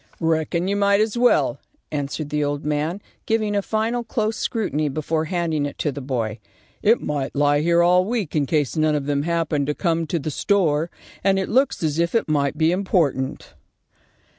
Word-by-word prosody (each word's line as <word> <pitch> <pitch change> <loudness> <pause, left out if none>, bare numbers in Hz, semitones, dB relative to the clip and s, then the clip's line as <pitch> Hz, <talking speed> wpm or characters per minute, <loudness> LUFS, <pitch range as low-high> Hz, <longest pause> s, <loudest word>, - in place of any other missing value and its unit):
"Reckon 165 +2 0
you 200 - 0
might 200 0 +3
as 215 +1 +1
well," 245 +1 +3 0.3
answered 145 0 -3
the 150 0 0
old 145 0 -2
man, 150 +6 -1 0.2
giving 215 -2 +1
a 200 - +2
final 225 +4 -1
close 220 -1 -1
scrutiny 155 - -1
before 155 +2 -1
handing 160 -4 -1
it 140 - -9
to 150 - -1
the 140 +1 -7
boy. 120 -5 -3 0.4
"It 225 +3 +3
might 145 -2 -3
lie 145 0 +3
here 170 +2 +3
all 180 +1 +5
week 210 -6 -2
in 145 -3 +1
case 150 -4 0
none 155 -1 +2
of 145 -2 -2
them 140 -1 0
happened 160 -3 0
to 150 - -1
come 165 -3 0
to 170 - -1
the 155 0 -3
store, 165 -3 +1 0.3
and 195 0 +3
it 190 - -1
looks 260 -5 +2
as 155 0 0
if 170 +5 0
it 230 - +2
might 145 -1 0
be 160 +1 +3
important." 170 -8 0
160 Hz, 190 wpm, -22 LUFS, 145-195 Hz, 0.4 s, all